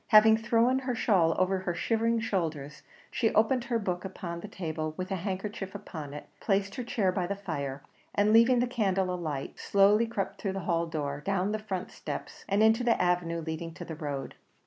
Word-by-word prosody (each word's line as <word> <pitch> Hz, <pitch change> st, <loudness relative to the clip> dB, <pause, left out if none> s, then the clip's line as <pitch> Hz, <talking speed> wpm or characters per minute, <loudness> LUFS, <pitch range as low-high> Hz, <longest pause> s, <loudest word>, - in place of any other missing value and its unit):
Having 220 Hz, 0 st, +7 dB
thrown 235 Hz, +3 st, +3 dB
her 255 Hz, -2 st, -2 dB
shawl 175 Hz, -8 st, +3 dB
over 185 Hz, +1 st, +2 dB
her 180 Hz, -2 st, -2 dB
shivering 230 Hz, +4 st, +1 dB
shoulders, 160 Hz, -9 st, -2 dB, 0.3 s
she 225 Hz, -3 st, +1 dB
opened 235 Hz, +3 st, +3 dB
her 240 Hz, -3 st, 0 dB
book 180 Hz, -5 st, -2 dB
upon 175 Hz, -3 st, -5 dB
the 210 Hz, -, -7 dB
table 155 Hz, -5 st, -4 dB
with 185 Hz, +1 st, -4 dB
a -, -, +1 dB
handkerchief 195 Hz, +1 st, -4 dB
upon 155 Hz, -8 st, -7 dB
it 150 Hz, -, -8 dB
placed 200 Hz, -1 st, 0 dB
her 250 Hz, -, -4 dB
chair 215 Hz, -5 st, +1 dB
by 180 Hz, -2 st, -1 dB
the 200 Hz, -, -2 dB
fire, 140 Hz, -8 st, -4 dB, 0.3 s
and 205 Hz, +1 st, +3 dB
leaving 230 Hz, +3 st, +6 dB
the -, -, +3 dB
candle 195 Hz, -6 st, 0 dB
alight, 155 Hz, -6 st, -4 dB
slowly 205 Hz, +3 st, +4 dB
crept 210 Hz, -4 st, -3 dB
through 195 Hz, -2 st, -1 dB
the 195 Hz, -, -3 dB
hall 170 Hz, -1 st, 0 dB
door, 145 Hz, -3 st, -3 dB
down 195 Hz, +1 st, 0 dB
the 215 Hz, -, -1 dB
front 190 Hz, -4 st, -4 dB
steps, -, -, -7 dB
and 200 Hz, +2 st, +3 dB
into 225 Hz, +2 st, +4 dB
the 235 Hz, -1 st, +3 dB
avenue 175 Hz, -2 st, +1 dB
leading 160 Hz, +1 st, -5 dB
to -, -, -7 dB
the 160 Hz, -, -6 dB
road. 145 Hz, -4 st, -4 dB
190 Hz, 200 wpm, -29 LUFS, 170-220 Hz, 0.3 s, Having